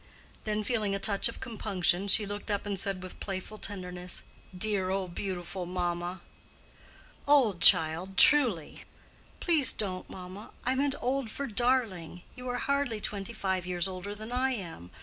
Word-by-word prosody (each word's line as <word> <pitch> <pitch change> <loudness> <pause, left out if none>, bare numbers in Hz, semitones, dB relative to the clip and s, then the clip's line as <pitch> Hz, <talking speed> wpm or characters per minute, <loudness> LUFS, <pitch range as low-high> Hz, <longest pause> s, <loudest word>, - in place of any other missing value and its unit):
Then, 215 0 -1
feeling 210 -3 0
a - - -2
touch 200 +2 +3
of 230 - -8
compunction, 200 -5 0
she 205 +1 +5
looked 205 +2 -5
up 205 0 -1
and 200 -2 -1
said 195 -1 -1
with 185 - -9
playful 195 +2 -5
tenderness, 180 -2 -5 0.3
"Dear, 195 -1 +1
old, 190 -2 -2
beautiful 180 -1 -4
mamma!" 175 0 -3 1.1
"Old, 250 -11 +4
child, 175 +2 +5
truly." 240 - +5 0.6
"Please 320 -6 +2
don't, 185 -3 -1
mamma! 185 +3 -9 0.2
I 255 - +2
meant 275 +1 +1
old 260 -1 -1
for 280 +6 -4
darling. 220 - 0
You 250 -1 -7
are 245 - -1
hardly 280 -4 0
twenty 200 +1 -3
five 190 -4 -2
years 180 0 -1
older 190 +2 -6
than 215 +2 -9
I 260 +1 +1
am. 165 - -8
200 Hz, 155 wpm, -29 LUFS, 180-230 Hz, 1.1 s, she